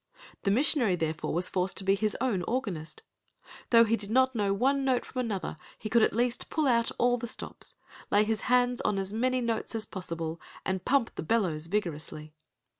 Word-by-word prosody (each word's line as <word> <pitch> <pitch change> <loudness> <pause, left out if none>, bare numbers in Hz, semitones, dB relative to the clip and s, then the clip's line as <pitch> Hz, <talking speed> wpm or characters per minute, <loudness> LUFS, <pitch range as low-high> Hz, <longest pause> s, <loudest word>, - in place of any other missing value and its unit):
The - - 0
missionary 240 - +3
therefore 160 -2 -2
was 175 +3 0
forced 185 0 -1
to 195 - -3
be 195 +1 +3
his 210 +1 0
own 235 -7 0
organist. 215 - -3 0.7
Though 230 -1 +7
he 230 0 +2
did 205 -2 -5
not 260 +3 +3
know 205 -4 0
one 270 +7 +2
note 260 -2 +1
from 255 - -6
another, 210 -9 -3 0.2
he 215 - -6
could 235 0 +4
at - - +3
least 240 +1 0
pull 310 -1 0
out 235 -2 +3
all 245 0 +3
the 240 - -4
stops, - - -6 0.3
lay 205 +1 +4
his 220 0 -1
hands 245 0 +3
on 210 - 0
as 195 +1 -2
many 255 +3 +1
notes 230 -1 -2
as 220 -1 -1
possible, 165 -5 -5 0.2
and 190 -1 -1
pump 265 -3 +2
the - - -5
bellows 165 -4 0
vigorously. 155 -5 -3
220 Hz, 195 wpm, -29 LUFS, 185-245 Hz, 0.7 s, Though